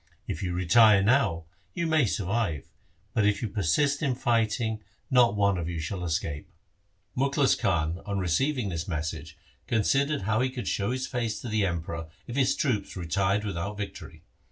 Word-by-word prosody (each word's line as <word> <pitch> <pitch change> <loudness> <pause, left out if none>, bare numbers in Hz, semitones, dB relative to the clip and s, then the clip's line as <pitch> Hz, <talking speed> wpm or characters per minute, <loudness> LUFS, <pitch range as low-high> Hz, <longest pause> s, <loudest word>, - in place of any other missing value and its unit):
If 80 - -4
you 90 -2 -2
retire 100 +3 +5
now, 100 -9 +2 0.3
you 170 - -1
may 155 -6 +3
survive, 100 -6 -1 0.5
but 110 - +2
if 105 +2 +1
you - - 0
persist 115 - +1
in 135 -4 +1
fighting, 115 -2 0 0.3
not 120 -4 +5
one 100 -2 +2
of 85 0 -3
you 85 -2 -3
shall 90 +3 -4
escape.' 80 -3 -3 0.7
Mukhlis 140 +1 +2
Khan 85 -2 0
on 100 -1 -1
receiving 105 - 0
this 85 -2 -4
message 80 -1 -4 0.3
considered 135 +4 +1
how 110 +4 +1
he 130 - +1
could 130 -2 -6
show 100 +1 0
his 130 +1 -2
face 115 -3 -2
to 120 - -6
the 105 -2 +1
Emperor 85 -1 -4 0.2
if 120 - -7
his 135 0 +2
troops 110 - -1
retired 95 +4 0
without 100 +1 -4
victory. 105 -1 -7
105 Hz, 170 wpm, -27 LUFS, 85-125 Hz, 0.7 s, retire